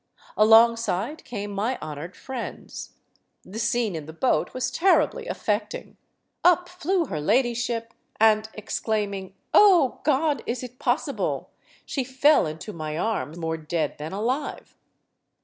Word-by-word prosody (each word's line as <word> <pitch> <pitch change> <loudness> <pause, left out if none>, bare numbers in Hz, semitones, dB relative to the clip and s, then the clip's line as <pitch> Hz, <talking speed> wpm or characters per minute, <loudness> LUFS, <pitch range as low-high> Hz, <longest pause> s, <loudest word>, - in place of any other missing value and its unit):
Alongside 230 - +4
came 205 -3 -5
my 215 +6 -1
honored 155 +3 -7
friends. 260 -3 -7 0.5
The 210 +4 -8
scene 230 -3 0
in 155 -2 -6
the 160 - -8
boat 250 +10 +1
was 255 0 -2
terribly 390 - +2
affecting. 210 - -3 0.5
Up 360 0 +4
flew 360 0 0
her 155 - -4
ladyship, 235 - 0 0.3
and, 220 0 +4
exclaiming: 205 -3 -3 0.2
"Oh, 365 -10 +6
God, 300 0 +2
is 245 +1 -2
it 250 +1 -9
possible?" - - -1 0.3
she 270 - -2
fell 265 - +4
into 160 +7 -7
my 155 -1 -4
arm, 175 -5 -2
more 160 -1 -2
dead 155 -1 -2
than 155 +2 -5
alive. 250 +9 -3
225 Hz, 130 wpm, -25 LUFS, 190-260 Hz, 0.5 s, Oh